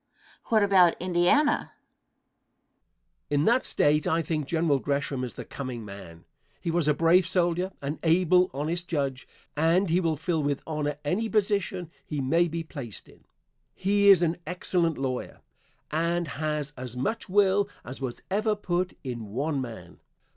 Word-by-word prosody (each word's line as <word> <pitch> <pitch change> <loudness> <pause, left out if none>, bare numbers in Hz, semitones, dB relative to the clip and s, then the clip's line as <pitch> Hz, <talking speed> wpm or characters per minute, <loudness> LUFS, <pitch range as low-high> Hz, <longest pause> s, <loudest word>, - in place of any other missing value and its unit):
Question. 230 - -1
What 215 - +5
about 185 -4 +5
Indiana? 180 - +3
Answer. - - -12 1.6
In 145 +1 +2
that 240 +3 +4
State 150 +3 +2
I 165 -1 +1
think 155 -2 -2
General 160 -4 +1
Gresham 140 -1 -2
is 125 - -5
the - - -7
coming 125 -5 -6
man. 95 -5 -11 0.3
He 170 - -2
was 170 -2 +1
a 150 - +3
brave 170 +3 +4
soldier, 180 0 +1
an 145 +3 -3
able, 180 +2 +4
honest 165 +5 -3
judge, 140 -5 -2 0.3
and 165 +4 +2
he 175 - +4
will 165 -4 0
fill 160 +1 -1
with 145 -1 -1
honor 150 -2 -2
any 215 +9 0
position 195 -5 0
he 150 - -4
may 165 +6 +2
be 165 0 -4
placed 140 - -8
in. - - -20 0.5
He 200 +1 +3
is 185 -3 +7
an 165 0 +1
excellent 175 -2 0
lawyer, 130 -2 -4 0.5
and 170 +1 0
has 150 0 -3
as 125 -1 -7
much 220 - -2
will 200 +1 +3 0.2
as 130 +3 -8
was 130 -3 -5
ever 215 +2 +1
put 185 -2 -2
in 120 -5 -5
one 140 +7 -2
man. 110 -8 -9
165 Hz, 160 wpm, -27 LUFS, 140-180 Hz, 1.6 s, is